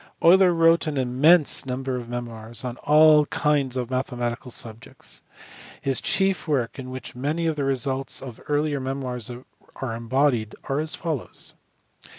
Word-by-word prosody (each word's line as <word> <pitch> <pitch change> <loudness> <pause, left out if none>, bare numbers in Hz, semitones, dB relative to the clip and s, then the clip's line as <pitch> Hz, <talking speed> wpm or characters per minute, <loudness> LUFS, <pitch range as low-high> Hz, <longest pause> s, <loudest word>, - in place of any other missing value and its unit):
Euler 180 +2 +7
wrote 165 0 +4
an 150 -2 -2
immense 135 +6 +4
number 130 0 -3
of 120 -2 -6
memoirs 115 -1 -5
on 120 -1 -4
all 150 0 +5
kinds 140 -4 0
of 125 0 -3
mathematical 125 -1 -3
subjects. 115 -2 -6 0.6
His 135 -1 -1
chief 195 -3 +1
works, 135 -4 -1
in 130 -1 -7
which 130 -2 -7
many 150 +6 -2
of 160 -1 +1
the 145 -2 -2
results 135 0 -1
of 125 -4 -9
earlier 145 -1 0
memoirs 130 -3 -3 0.5
are 125 -4 -4
embodied, 115 -1 0
are 135 +1 -2
as 155 +1 -1
fol 160 -4 -2
lows. - - -3
135 Hz, 155 wpm, -24 LUFS, 125-150 Hz, 0.6 s, Euler